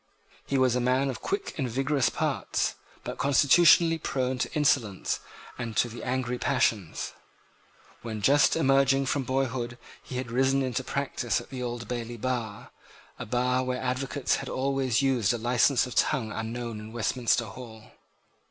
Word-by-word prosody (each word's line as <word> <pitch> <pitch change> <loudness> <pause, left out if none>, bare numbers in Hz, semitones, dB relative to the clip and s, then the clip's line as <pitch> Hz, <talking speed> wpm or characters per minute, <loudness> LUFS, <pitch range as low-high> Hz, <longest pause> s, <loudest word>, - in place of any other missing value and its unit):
He 140 - 0
was 130 -2 +3
a - - +1
man 130 +2 +2
of - - -8
quick 395 0 -3
and 130 -3 -1
vigorous 135 +2 +1
parts, - - -1 0.3
but - - -6
constitutionally 165 +4 +5
prone 130 -3 -2
to - - -1
insolence 130 - +1 0.4
and 115 -3 -4
to - - +3
the 120 +1 -8
angry 125 -1 -2
passions. 110 - 0 0.9
When 110 -2 -5
just 145 +5 +5
emerging 135 -2 +3
from 135 0 -1
boyhood 130 -2 -2 0.2
he 125 - -7
had 125 -2 -4
risen 135 +2 +2
into 130 0 -2
practice 130 -3 -1
at - - -13
the 130 -1 -5
Old 120 -1 -4
Bailey 120 -1 -4
bar, 115 -3 -4 0.5
a - - -6
bar 125 +2 +1
where 125 0 -2
advocates 130 +1 -1
have - - -6
always 135 -2 0
used 125 -4 +2
a - - -1
license 125 +3 +3
of 125 - -7
tongue 110 -1 +1
unknown 115 0 -4
in 110 +1 -10
Westminster 120 +1 +1
Hall. 110 -1 -11
125 Hz, 160 wpm, -27 LUFS, 120-135 Hz, 0.9 s, constitutionally